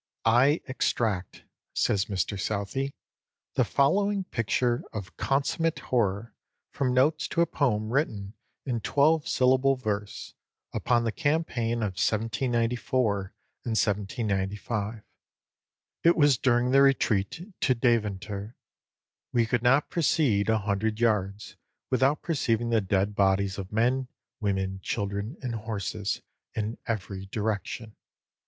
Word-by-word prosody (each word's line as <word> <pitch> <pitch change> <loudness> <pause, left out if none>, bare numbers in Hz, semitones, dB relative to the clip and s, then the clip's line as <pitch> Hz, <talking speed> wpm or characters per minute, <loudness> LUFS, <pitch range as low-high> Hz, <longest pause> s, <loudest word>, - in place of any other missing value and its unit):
"I 125 +7 +4
extract" 110 -7 -1 0.3
(says 100 -1 +2
Mr 100 0 -2
Southey) 110 +8 -2 0.6
"the - - +3
following 200 +8 +2
picture 120 - 0
of 100 -3 -7
consummate 145 +4 0
horror 110 -2 -1 0.4
from 135 -3 0
notes 155 +5 +3
to 170 - 0
a - - +5
poem 110 -8 0
written 105 -9 -1 0.3
in 125 -4 -1
twelve 150 +6 +3
syllable 130 +1 +3
verse, 105 -5 -4 0.4
upon 120 -1 +1
the 115 - 0
campaign 120 -6 0
of 95 -4 -3
1794 115 -2 0 0.3
and 120 - -3
1795: 105 +1 -1 1.0
it 170 +1 +5
was 145 -3 +5
during 125 -1 +2
the 135 +1 +6
retreat 135 - +1
to 130 - +2
Deventer. 105 -2 -1 0.8
'We 120 -2 +3
could 115 +1 0
not 135 +4 +3
proceed 140 -11 +2
a 110 - +4
hundred 105 +1 -1
yards 105 -3 0 0.3
without 130 +3 +2
perceiving 120 -7 0
the 115 -2 +3
dead 100 +1 0
bodies 100 0 +1
of 95 0 -6
men, 125 +4 +1 0.3
women, 95 -2 -1
children, 100 - -3
and 125 -2 -2
horses, 105 -2 -3 0.3
in 110 +1 -3
every 100 -3 -4
direction. 110 +1 -3
115 Hz, 120 wpm, -27 LUFS, 100-130 Hz, 1.0 s, the